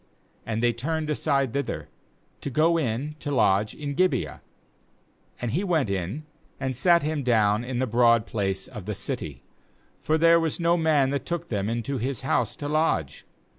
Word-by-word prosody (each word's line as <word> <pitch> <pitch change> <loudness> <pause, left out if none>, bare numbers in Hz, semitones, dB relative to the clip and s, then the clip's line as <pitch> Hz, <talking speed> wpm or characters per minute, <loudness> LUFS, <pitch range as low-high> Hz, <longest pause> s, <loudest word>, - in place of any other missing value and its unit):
15And 110 0 -1
they 120 0 +3
turned 155 +6 -2
aside 140 -4 +1
thither, 140 -1 -3 0.5
to - - -3
go 155 +6 +3
in 140 +3 -2
to 150 - -5
lodge 105 -6 +2
in 145 -2 -4
Gibeah; 140 - 0 1.0
and 120 -2 -2
he 170 - 0
went 160 - +1
in, 100 - -3 0.3
and 130 -1 -2
sat^him 155 +1 +2
down 110 -3 +3
in 125 0 -4
the 130 - +1
broad 115 -1 +4
place 95 -3 -2
of 105 -2 -9
the 105 - -2
city; 100 - -4 0.6
for 155 - +1
there 165 +1 +6
was 165 0 -1
no 170 0 +3
man 155 -5 +2
that 140 - -3
took 170 -1 -3
them 100 -2 -1
into 120 +3 -2
his 130 +1 -2
house 130 - 0
to 145 - -5
lodge. 150 - 0
135 Hz, 170 wpm, -26 LUFS, 110-155 Hz, 1.0 s, there